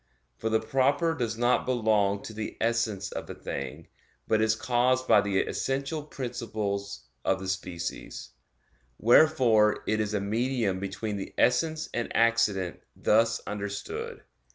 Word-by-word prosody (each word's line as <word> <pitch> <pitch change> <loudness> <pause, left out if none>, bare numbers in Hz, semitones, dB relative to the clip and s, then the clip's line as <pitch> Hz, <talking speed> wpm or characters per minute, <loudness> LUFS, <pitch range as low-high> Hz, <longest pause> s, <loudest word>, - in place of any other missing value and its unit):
For 110 - -3
the 110 0 +3
'proper' 140 +8 +2
does 115 -7 -2
not 120 +2 +2
belong 105 -5 +2
to 110 - -8
the 110 0 -5
essence 115 -4 0
of - - -6
a - - -6
thing, 70 -2 -6 0.4
but 110 -1 +2
is 110 0 +3
caused 125 +2 +1
by 105 - +6
the 100 -1 -1
essential 140 +3 -2
principles 110 - -4 0.2
of - - +1
the 95 - -6
species; 95 -1 -5 0.7
wherefore 115 -4 +4
it 110 - 0
is 105 0 -1
a - - +1
medium 110 -1 0
between 100 +2 -4
the 95 - -7
essence 155 +5 +2
and 120 - -2
accident 110 -6 +2 0.2
thus 115 +1 +2
understood. 105 - -5
110 Hz, 140 wpm, -28 LUFS, 100-125 Hz, 0.7 s, by